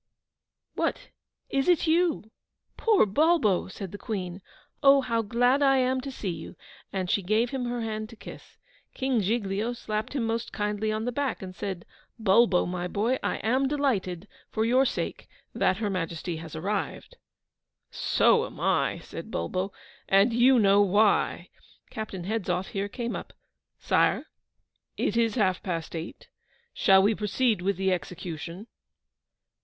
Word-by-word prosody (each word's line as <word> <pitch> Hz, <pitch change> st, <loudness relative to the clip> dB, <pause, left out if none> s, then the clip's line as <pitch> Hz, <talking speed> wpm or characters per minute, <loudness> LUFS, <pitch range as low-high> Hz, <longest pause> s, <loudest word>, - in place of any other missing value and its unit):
'What, -, -, -2 dB, 0.4 s
is 275 Hz, +4 st, +1 dB
it 350 Hz, -2 st, +4 dB
you? 325 Hz, -9 st, +1 dB, 0.4 s
poor 435 Hz, -, +4 dB
Bulbo!' 235 Hz, -, +2 dB
said 190 Hz, -1 st, -7 dB
the 205 Hz, -, -8 dB
Queen.' 190 Hz, -4 st, -4 dB, 0.4 s
Oh, 275 Hz, -1 st, +7 dB
how 230 Hz, -3 st, 0 dB
glad 245 Hz, +5 st, +2 dB
I 270 Hz, -1 st, +5 dB
am 260 Hz, 0 st, +1 dB
to 275 Hz, -, -6 dB
see 215 Hz, -8 st, -4 dB
you,' 170 Hz, -, -8 dB, 0.4 s
and 190 Hz, -2 st, -2 dB
she 200 Hz, -, +1 dB
gave 215 Hz, +6 st, +1 dB
him 265 Hz, -2 st, -2 dB
her 240 Hz, 0 st, -2 dB
hand 215 Hz, -1 st, -4 dB
to 230 Hz, -, -12 dB
kiss. -, -, -12 dB, 0.4 s
King 260 Hz, -4 st, +1 dB
Giglio 210 Hz, +2 st, -1 dB
slapped 215 Hz, -1 st, -4 dB
him 265 Hz, -5 st, -1 dB
most 230 Hz, +1 st, -2 dB
kindly 210 Hz, +1 st, -1 dB
on 215 Hz, +1 st, -2 dB
the 245 Hz, -, -1 dB
back, 270 Hz, -4 st, -2 dB
and 185 Hz, -1 st, -8 dB
said, 190 Hz, -4 st, -5 dB, 0.3 s
'Bulbo, 220 Hz, -3 st, +4 dB
my 180 Hz, 0 st, -3 dB
boy, 225 Hz, +8 st, 0 dB
I -, -, -1 dB
am 260 Hz, +5 st, +2 dB
delighted, 210 Hz, -, -1 dB, 0.2 s
for 220 Hz, 0 st, 0 dB
your 255 Hz, +3 st, +4 dB
sake, -, -, -3 dB, 0.3 s
that 185 Hz, -, +2 dB
Her 215 Hz, -1 st, -1 dB
Majesty 170 Hz, -2 st, -3 dB
has 160 Hz, 0 st, -9 dB
arrived.' 205 Hz, -, -3 dB, 0.7 s
'So 480 Hz, 0 st, +3 dB
am -, -, -13 dB
I,' -, -, +1 dB
said -, -, -8 dB
Bulbo; 190 Hz, +2 st, -2 dB, 0.4 s
'and 195 Hz, +5 st, +5 dB
YOU 250 Hz, +2 st, +5 dB
KNOW 200 Hz, -2 st, +5 dB
WHY.' 205 Hz, +2 st, +2 dB, 0.4 s
Captain 205 Hz, -5 st, -5 dB
Hedzoff 190 Hz, -2 st, -2 dB
here 200 Hz, +1 st, -3 dB
came 235 Hz, +1 st, -4 dB
up. -, -, -7 dB, 0.4 s
'Sire, -, -, +2 dB, 0.7 s
it 210 Hz, -, 0 dB
is 230 Hz, -2 st, +2 dB
half 190 Hz, -6 st, +1 dB
past 170 Hz, -3 st, -4 dB
eight: 165 Hz, +1 st, -7 dB, 0.5 s
shall 190 Hz, 0 st, +5 dB
we 210 Hz, +3 st, +4 dB
proceed 215 Hz, 0 st, 0 dB
with 195 Hz, 0 st, 0 dB
the 190 Hz, 0 st, +1 dB
execution? 175 Hz, +2 st, -6 dB
215 Hz, 155 wpm, -27 LUFS, 190-245 Hz, 0.7 s, Oh